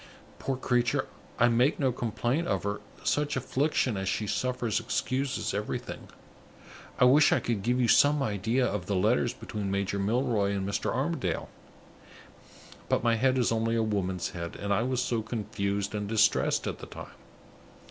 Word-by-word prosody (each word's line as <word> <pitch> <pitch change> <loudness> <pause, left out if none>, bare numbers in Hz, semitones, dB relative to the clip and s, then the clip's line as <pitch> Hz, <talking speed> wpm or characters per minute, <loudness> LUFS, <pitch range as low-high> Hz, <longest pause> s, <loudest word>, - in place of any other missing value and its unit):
Poor 135 -1 -2
creature, 120 -2 +1 0.3
I 120 - +5
make 120 +4 +2
no 135 -3 +2
complaint 120 +7 -1
of - - 0
her; 100 0 -3 0.2
such 150 0 0
affliction 135 -3 0
as 95 0 -2
she 110 - -1
suffers 125 0 -1
excuses 130 +1 -2
everything. - - -4 0.9
I - - +5
wish 140 +4 +6
I - - +4
could 115 -4 -2
give 125 +5 +1
you 125 - +3
some 145 +4 +5
idea 115 +3 0
of 100 -5 -3
the 100 - 0
letters 90 - +2
between 105 -2 -5
Major 100 0 -1
Milroy 105 -1 +1
and 95 -1 -2
Mr. 100 +1 -1
Armadale; - - -2 1.4
but - - +1
my 120 -1 +3
head 130 +3 +2
is 125 -3 +2
only 115 0 +1
a 115 - +2
woman's 95 -4 -1
head, 85 -1 -6
and 100 0 -1
I 100 - +2
was 125 +1 0
so 120 -3 -1
confused 100 -3 -3
and 105 -1 -3
distressed 110 0 +2
at - - -4
the - - -9
time! - - -8
115 Hz, 170 wpm, -28 LUFS, 100-125 Hz, 1.4 s, wish